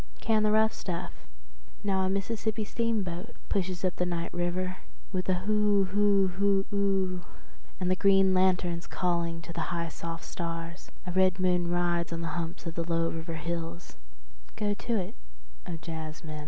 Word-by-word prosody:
Can 220 -1 +3
the 215 0 +3
rough 220 +1 +4
stuff… 175 -1 -4 0.7
now 195 -2 +2
a 185 - +2
Mississippi 215 +3 -1
steamboat 215 -3 -1
pushes 185 -1 0
up 180 - 0
the - - +1
night 170 -1 -2
river 180 +1 -1 0.3
with 185 -1 -2
a 185 - +4
hoo 210 -1 +4
hoo 200 -1 +4
hoo 195 +1 +2
oo… 195 -2 +1 0.6
and 185 -1 +1
the - - +4
green 195 0 +5
lanterns 180 -2 +2
calling 170 -2 0
to 170 - -7
the - - -2
high 170 -1 -1
soft 165 +1 -6
stars… 165 0 -5 0.2
a 180 - -3
red 185 0 +4
moon 180 -2 +2
rides 175 -1 +1
on 165 0 -2
the 165 - -2
humps 170 +1 -4
of 165 - -3
the 170 - -1
low 165 0 +2
river 165 0 -4
hills… 170 +1 -4 0.6
go 210 -1 0
to 235 +3 -2
it, 190 +2 -3 0.5
O 175 - -3
jazzmen. 160 -1 -6
180 Hz, 170 wpm, -30 LUFS, 170-195 Hz, 0.7 s, green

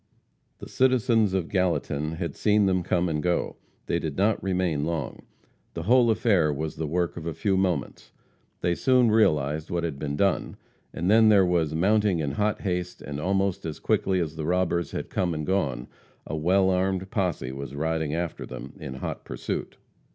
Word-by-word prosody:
The - - -10
citizens 115 -6 +2
of 90 -4 -1
Gallatin 80 -5 -1
had 85 0 -4
seen 105 -1 +3
them 95 -1 +2
come 90 +1 0
and 75 -2 -1
go. 90 +1 -1 0.3
They 85 - 0
did 80 -4 -4
not 105 +3 +2
remain 90 -6 0
long. 80 -4 -4 0.5
The - - -4
whole 120 +1 +4
affair 100 -8 +3
was 75 +2 -4
the 80 - -2
work 85 +3 -1
of 85 0 -6
a 80 - -3
few 95 +4 0
moments. 90 -6 -2 0.5
They 85 - +1
soon 125 +3 +3
realized 75 -8 +2
what 85 -1 -1
had 80 -5 -3
been 70 0 -3
done, 100 +5 0 0.3
and 85 - -3
then 110 0 +6
there 100 -3 +6
was 85 -3 +1
mounting 100 +2 +2
in 75 -3 -1
hot 105 +8 -1
haste, 90 -2 -3
and 70 -1 -5
almost 95 +2 0
as 80 -2 -5
quickly 95 -1 +1
as 80 -3 -2
the 80 - -3
robbers 85 0 0
had - - -6
come 90 -3 0
and 75 -1 -3
gone, 70 -11 -1 0.4
a 80 - -4
well 95 +5 +3
armed 95 0 -1
posse 90 - -1
was 70 0 -7
riding 80 0 -1
after 85 -1 -3
them - - -8
in 65 - -6
hot 65 - -5
pursuit. - - -5
90 Hz, 185 wpm, -26 LUFS, 80-95 Hz, 0.5 s, then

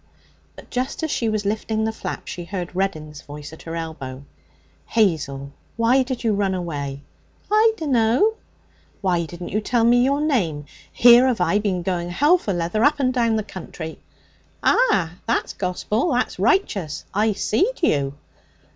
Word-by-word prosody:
But - - -14
just 255 +5 -2
as 315 - -1
she 230 - 0
was 215 -1 -1
lifting 215 +1 -1
the 220 - 0
flap 220 - -6
she 175 - -6
heard 180 -1 -5
Reddin's 155 -6 -3
voice 150 +1 -10
at 160 - -12
her 165 0 -6
elbow. 140 -5 -6 0.6
'Hazel, 145 -10 0 0.3
why 235 +4 +4
did 255 -1 -3
you 225 -2 +2
run 200 -2 0
away?' 145 -6 -4 0.5
'I 440 +1 +5
dunno.' 265 - +2 0.7
'Why 175 -4 +1
didn't 175 +2 -8
you 215 - -1
tell 235 +2 +1
me 240 +1 +5
your 280 +2 +2
name? 190 - 0 0.3
Here 245 +2 +7
have 250 -5 0
I 180 +3 +2
been 190 -4 -1
going 175 -1 -2
hell 295 - +4
for 210 - -3
leather 175 +5 0
up 290 +1 +3
and 255 -2 +1
down 230 -3 +2
the 215 - 0
country.' 165 -4 -8 0.6
'Ah! 185 - +3
That's 230 - 0
gospel! 205 - -1
That's 245 -6 -1
righteous! 195 - 0
I 210 +2 +2
seed 360 - 0
you.' 140 - +1
205 Hz, 165 wpm, -22 LUFS, 170-245 Hz, 0.7 s, Here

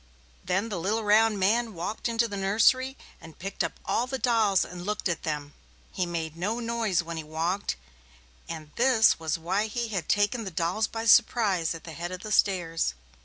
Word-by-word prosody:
Then 190 +5 0
the 195 -5 -3
little 210 +6 -1
round 215 +1 +4
man 220 +3 +1
walked 180 +8 -3
into 230 0 +1
the 205 - -6
nursery 225 +7 +2 0.2
and 165 -1 -13
picked 195 +3 -3
up - - -4
all 245 - 0
the 265 +1 -3
dolls 225 -7 +2
and 175 0 -8
looked 210 +2 -2
at 175 - -2
them. 150 -2 -4 0.4
He 180 - -2
made 165 -2 -4
no 205 +8 -2
noise 230 -6 0
when 165 0 -6
he 160 - -4
walked, 165 +6 -2 0.7
and 155 -2 -7
this 240 -6 +4
was 160 0 -1
why 190 +6 -1
he 235 +1 -3
had 190 -7 -3
taken 205 +3 +2
the 195 - -4
dolls 180 +6 0
by 225 0 -5
surprise 195 -7 +4
at 165 - -10
the 160 - -9
head 175 +2 -5
of 185 0 -6
the 215 - -7
stairs. 165 - +1
195 Hz, 195 wpm, -27 LUFS, 170-225 Hz, 0.7 s, round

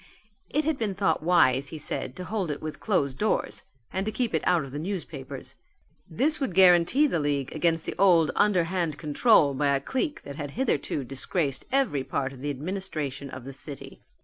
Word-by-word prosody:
It 300 - +1
had 315 -3 0
been 210 -4 -1
thought 195 -5 +1
wise, 145 -6 +3
he 160 - -6
said, 130 -3 -4
to 185 - -6
hold 195 -3 -2
it 145 - -3
with 155 -1 -6
closed 140 - 0
doors 215 - 0 0.3
and 190 - -1
to - - 0
keep 240 -2 -2
it 160 - +1
out 175 -4 +3
of 135 - -9
the 145 - -5
newspapers. 160 -6 -6 0.6
This 300 - +1
would 265 - -2
guarantee 185 - +6
the 220 - +1
league 140 -2 -1
against 165 0 +1
the - - -3
old 175 -5 +5
underhand 180 -5 +1
control 150 - +4
by 140 +1 +2
a - - +1
clique 265 - -3
that 140 0 -8
had 145 +2 -6
hitherto 155 - 0
disgraced 135 +2 -2
every 260 - +1
part 135 0 -2
of 130 - -12
the 145 - -2
administration 145 -3 -4
of 130 -1 -8
the 135 +2 -8
city. 140 +1 -8
160 Hz, 195 wpm, -27 LUFS, 140-195 Hz, 0.6 s, guarantee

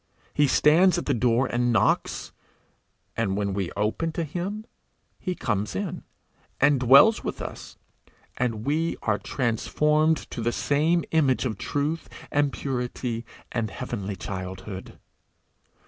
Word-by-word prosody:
He 145 -1 +3
stands 165 +7 +5
at - - -3
the 140 - +1
door 120 +1 +2
and 120 0 +1
knocks, 115 - +1 0.8
and 100 -4 0
when 100 -1 -1
we 95 -3 -2
open 110 +11 0
to 170 - -1
him 185 +8 -4 0.5
he 180 -2 -3
comes 105 - -2
in, 200 -4 -4 0.5
and 145 -2 +4
dwells 135 - +6
with - - -4
us, - - -8 0.6
and 115 -3 -2
we 160 +3 0
are 110 -2 +1
transformed 150 +6 +1
to - - -4
the 120 +1 +1
same 155 +7 +1
image 140 -5 +2
of 115 -3 -3
truth 145 +6 -2 0.2
and 145 -1 +2
purity 125 -3 -3 0.2
and 115 -3 -1
heavenly 105 -6 -4
childhood. 95 +1 -7
125 Hz, 130 wpm, -26 LUFS, 110-155 Hz, 0.8 s, dwells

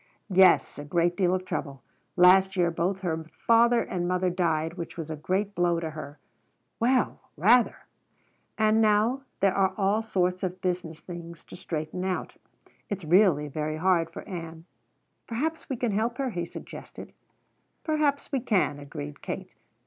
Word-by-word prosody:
"Yes, 185 -4 +5
a - - -5
great 170 +3 +1
deal 185 -1 +2
of 185 0 -4
trouble. 145 -6 -5 0.3
Last 190 +2 +6
year 175 -2 +2
both 180 +3 -1
her 160 -3 -2 0.2
father 235 +1 +5
and 175 -1 -3
mother 180 0 +1
died, 165 -3 0
which 170 -1 -7
was 160 -1 -5
a - - -3
great 190 +7 -1
blow 175 -2 +1
to 160 -1 -4
her." 150 -1 -8 0.6
"Well, 250 +2 +1 0.2
rather!" 230 +9 +4 0.8
"And 220 0 +3
now 220 +5 +3 0.2
there 195 -1 +4
are 190 -1 +1
all 205 +2 +2
sorts 185 -4 0
of 185 -1 -3
business 175 -3 -3
things 170 -2 -9
to - - -12
straighten 160 0 -4
out. 185 -1 -3 0.5
It's 200 -5 -4
really 170 -3 +4
very 155 +2 -3
hard 170 -1 +2
for - - -9
Ann." 165 -3 -7 0.6
"Perhaps 310 +8 -3
we 265 - -1
can 235 -2 -1
help 225 +4 -1
her," 270 -2 -1
he 175 -4 -3
suggested. - - -10 0.7
"Perhaps 300 -3 0
we 275 - +1
can," 200 - +1
agreed 75 - -8
Kate. - - -6
180 Hz, 160 wpm, -27 LUFS, 165-210 Hz, 0.8 s, Last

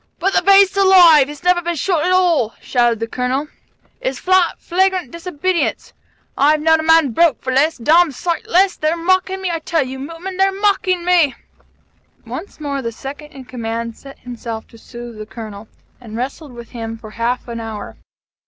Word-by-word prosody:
"But 385 +2 0
the - - +3
beast's 395 +1 +5
alive! 355 -7 +7
He's 295 +1 -10
never 360 0 +3
been 345 0 -2
shot 330 +1 0
at 360 - +1
all!" 345 -11 +2
shouted 240 -3 +1
the 230 - -2
Colonel. 255 +5 -2 0.5
"It's - - -3
flat, 370 -1 +2
flagrant 375 +1 0
disobedience! 340 +1 -2 0.4
I've 300 +3 +3
known 320 +1 +3
a - - 0
man 320 -3 +4
broke 335 +5 +3
for 260 - -3
less, 305 +5 +2
d 235 - -13
d 335 +5 +5
sight 340 +5 -3
less. 370 +2 +3
They're 310 +2 -1
mocking 375 +2 0
me, 365 - -1
I 330 - -2
tell 320 -2 -1
you, 265 +1 -7
Mutman! 330 +6 -7
They're 385 0 +3
mocking 375 -3 +1
me!" 340 -8 +3 0.9
Once 400 - -8
more, 280 -2 -3
the 230 -2 -4
Second 285 +5 -9
in 265 -2 -11
Command 230 -2 -5
set 275 0 -13
himself 230 -2 -7
to 230 - -16
sooth 240 -1 -10
the 215 - -7
Colonel, 215 -2 -9 0.3
and 225 -3 -9
wrestled 270 +3 -5
with 235 -1 -11
him 225 -2 -6
for 220 -1 -12
half 235 +3 -2
an 235 -1 -5
hour. 220 -2 -7
305 Hz, 190 wpm, -18 LUFS, 240-360 Hz, 0.9 s, alive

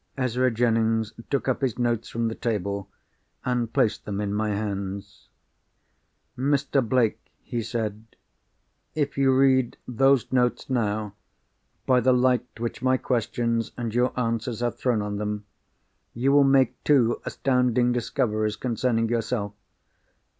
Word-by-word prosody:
Ezra 130 0 +1
Jennings 115 -2 +1 0.2
took 140 -2 -1
up 130 - 0
his 130 -5 -1
notes 120 -2 -1
from 115 0 -1
the 110 - -2
table, 100 -4 -3 0.6
and 120 -2 0
placed 105 - +1
them 100 -1 -4
in 100 -1 -2
my 105 +1 0
hands. 100 -1 -4 1.1
"Mr. 140 +1 +1
Blake," 120 -1 +1 0.2
he 120 - -3
said, 110 -2 -4 0.9
"if 145 -2 -1
you 135 -1 +3
read 130 -2 +3
those 135 +1 +2
notes 125 0 +1
now, 105 -4 -1 0.7
by 130 -1 +4
the 130 +1 +3
light 125 -1 +1
which 120 +1 -4
my 130 0 +3
questions 115 -2 -1
and 115 -3 -3
your 125 +1 +2
answers 115 0 -2
have 120 0 -1
thrown 120 -5 +1
on 105 0 -3
them, 105 0 -3 0.7
you 130 +4 +2
will 145 0 +6
make 135 -2 +3
two 125 -6 +3
astounding 125 -2 +1
discoveries 110 -3 0
concerning 115 0 0
yourself. 115 -2 -2
120 Hz, 135 wpm, -25 LUFS, 110-130 Hz, 1.1 s, will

